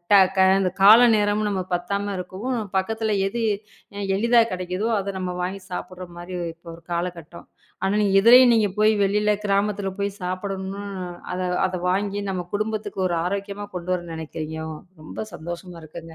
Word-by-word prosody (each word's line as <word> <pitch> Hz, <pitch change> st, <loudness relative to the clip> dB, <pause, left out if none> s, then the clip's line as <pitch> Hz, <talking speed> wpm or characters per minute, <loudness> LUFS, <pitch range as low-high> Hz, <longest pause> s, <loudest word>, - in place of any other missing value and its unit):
ட -, -, +9 dB, 0.2 s
க -, -, +5 dB, 0.4 s
கால 215 Hz, +4 st, +9 dB, 0.2 s
நேரம் 210 Hz, 0 st, +1 dB
நமக்குப் 185 Hz, -2 st, -2 dB
பத்தாம 200 Hz, +3 st, -3 dB
இருக்கவும், 200 Hz, +8 st, -4 dB, 0.2 s
பக்கத்துல 220 Hz, +2 st, -1 dB
எது 235 Hz, +4 st, -3 dB, 0.6 s
அ 200 Hz, -, -2 dB
எளிதா 235 Hz, +3 st, +4 dB
கெடைக்குதோ, 185 Hz, +4 st, -2 dB
அத 195 Hz, 0 st, -4 dB
நம்ம 180 Hz, -1 st, -2 dB
வாங்கி 190 Hz, +2 st, -4 dB
சாப்டுற 185 Hz, 0 st, -6 dB
மாரி 175 Hz, +1 st, -8 dB, 0.2 s
இப்ப 170 Hz, +1 st, -32 dB
ஒரு 170 Hz, -, -18 dB
காலகட்டம். 170 Hz, -1 st, -5 dB, 0.4 s
ஆனா 195 Hz, +2 st, +1 dB, 0.2 s
இதுலயும் 245 Hz, +4 st, +8 dB
நீங்கப் 210 Hz, -4 st, +2 dB
போய் 215 Hz, +1 st, +5 dB
வெளியில 210 Hz, +2 st, +2 dB
கிராமத்துல 200 Hz, 0 st, 0 dB
போய் 200 Hz, 0 st, 0 dB
சாப்பிடணும்னு, 190 Hz, +2 st, -4 dB, 0.5 s
அதை 180 Hz, 0 st, -2 dB, 0.2 s
அதை 185 Hz, 0 st, -3 dB
வாங்கி 200 Hz, +2 st, -1 dB
நம்ம 185 Hz, -2 st, -3 dB
குடும்பத்துக்கு 215 Hz, -1 st, -2 dB
ஒரு 175 Hz, -, -1 dB
ஆரோக்கியமா 200 Hz, +2 st, -3 dB
கொண்டு 180 Hz, +1 st, -3 dB
வர 180 Hz, -, -3 dB
நெனைக்கிறீங்க. 160 Hz, 0 st, -6 dB, 0.4 s
ரொம்ப 155 Hz, -, -6 dB
சந்தோஷமா 175 Hz, +1 st, -7 dB
இருக்குங்க. 165 Hz, +1 st, -10 dB
195 Hz, 150 wpm, -23 LUFS, 180-205 Hz, 0.6 s, ட